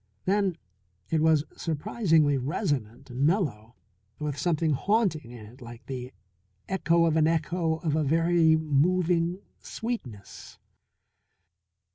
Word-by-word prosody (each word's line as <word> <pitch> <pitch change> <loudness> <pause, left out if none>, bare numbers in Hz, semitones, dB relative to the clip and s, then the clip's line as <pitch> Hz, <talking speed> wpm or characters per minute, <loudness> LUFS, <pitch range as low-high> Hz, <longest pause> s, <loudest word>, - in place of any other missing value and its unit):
Then 195 -2 +1 0.5
it 160 -1 +2
was 160 -2 +4
surprisingly 160 -2 +1
resonant 135 - -3
and 125 +2 -5
mellow, 140 - 0 0.4
with 150 -2 -3
something 160 0 0
haunting 185 - 0
in 120 -3 -10
it 120 +5 -16
like 120 0 -11
the 130 -1 -6 0.6
echo 170 -3 +2
of 160 -1 +2
an 155 -1 +4
echo 165 0 0
of 155 -3 0
a 155 - +1
very 165 +2 +3
moving 170 +4 +1 0.2
sweetness. 135 - -7
160 Hz, 115 wpm, -27 LUFS, 135-175 Hz, 0.6 s, was